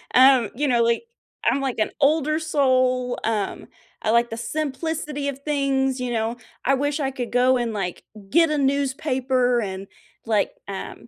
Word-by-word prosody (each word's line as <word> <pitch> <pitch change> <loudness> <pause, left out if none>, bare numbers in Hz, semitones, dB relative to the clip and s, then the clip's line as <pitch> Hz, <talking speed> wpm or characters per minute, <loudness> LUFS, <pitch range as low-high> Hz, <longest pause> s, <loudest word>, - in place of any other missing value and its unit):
Um, 255 -4 +6
you 290 +3 0
know, 240 -3 +3
like 235 - +1 0.4
I'm, 275 - +2
like, 265 -4 -2
an 215 - +1
older 305 +2 +3
soul, 255 -5 +1
um, 215 -3 -2 0.3
I - - -1
like 235 0 +3
the - - -3
simplicity 300 +1 -3
of 275 0 -6
things, 275 -3 0
you 250 -1 -2
know? 230 +1 -1 0.3
I 270 - +4
wish 285 +2 0
I 270 -2 -1
could 245 -3 -5
go 250 +1 +4
and, 240 -1 -1
like, 180 -4 -4 0.3
get 330 +5 +4
a 300 - 0
newspaper 265 -3 +1
and 195 -1 -5 0.4
like, 215 -2 +1 0.2
um 190 -11 -7
260 Hz, 170 wpm, -23 LUFS, 235-280 Hz, 0.4 s, Um